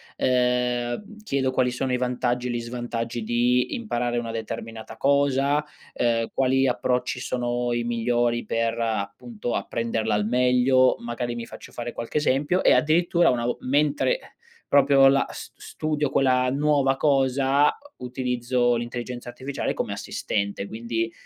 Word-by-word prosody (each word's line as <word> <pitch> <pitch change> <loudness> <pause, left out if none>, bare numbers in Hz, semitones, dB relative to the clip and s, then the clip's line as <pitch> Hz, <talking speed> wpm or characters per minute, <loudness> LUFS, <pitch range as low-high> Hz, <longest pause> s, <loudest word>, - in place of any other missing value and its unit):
ehm, 125 - 0
chiedo 135 -7 0
quali 130 -1 +2
sono 125 +1 -2
i - - +2
vantaggi 125 0 -1
e 125 - -2
gli 120 - -2
svantaggi 120 0 -4
di 120 +2 +1
imparare 120 - -2
una 115 -1 -3
determinata 110 0 -6
cosa, 140 +2 +2 0.3
ehm, 115 -1 0
quali 135 0 +2
approcci 125 0 0
sono 120 -1 -1
i 120 - -1
migliori 120 0 0
per, 115 +1 -1
appunto, 115 - -3
apprenderla 115 -2 -1
al 105 - 0
meglio, 125 +2 +4
magari 120 0 -4
mi 115 -1 -5
faccio - - -12
fare 120 0 -5
qualche 115 +5 -4
esempio 150 +5 +1
e - - +5
addirittura 170 +2 +3
una 120 -1 0
vo 120 - -1
mentre 145 - +1 0.5
proprio 140 -1 +6
la 140 0 +2
s - - -9
studio 150 -2 -2
quella 130 -2 +2
nuova 140 -1 +2
cosa, 135 0 +2 0.2
utilizzo 125 -1 0
l'intelligenza 120 +1 -5
artificiale 130 +3 -3
come - - -3
assistente, 100 -1 -3
quindi, 115 +1 -3
125 Hz, 140 wpm, -24 LUFS, 120-135 Hz, 0.5 s, proprio